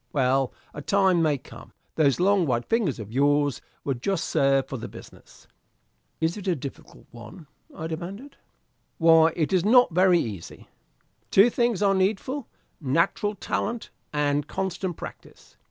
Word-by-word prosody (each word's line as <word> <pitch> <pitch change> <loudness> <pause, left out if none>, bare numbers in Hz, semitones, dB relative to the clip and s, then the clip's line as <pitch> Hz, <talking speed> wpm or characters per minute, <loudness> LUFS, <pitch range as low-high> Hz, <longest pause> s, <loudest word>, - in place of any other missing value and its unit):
Well, 135 -1 +1 0.2
a 150 - -7
time 190 0 +2
may 155 -3 +2
come - - -14 0.2
those 145 -2 +2
long 190 -2 +3
white 120 -2 0
fingers 225 - 0
of 110 -2 -8
yours 145 +2 +2 0.2
would 130 -4 -3
just 195 0 -1
serve 135 -1 +2
for 135 - -5
the - - -6
business." - - -15 0.7
"Is 165 +1 0
it 200 -1 -8
a 180 - +2
difficult 140 -2 -10
one?" 120 - -12 0.3
I 160 - -5
demanded. 185 - -7 0.6
"Why, 165 -1 +5
it 160 +3 -1
is 180 -2 +3
not 240 -2 +5
very 180 0 +5
easy. 105 - -6 0.6
Two 205 +5 +5
things 235 -5 +1
are 200 -1 +4
needful 215 +8 -1 0.3
natural 170 +8 0
talent 225 +3 -3 0.2
and 145 -1 0
constant 190 -2 -3
practice. - - -11
165 Hz, 150 wpm, -25 LUFS, 140-195 Hz, 0.7 s, Why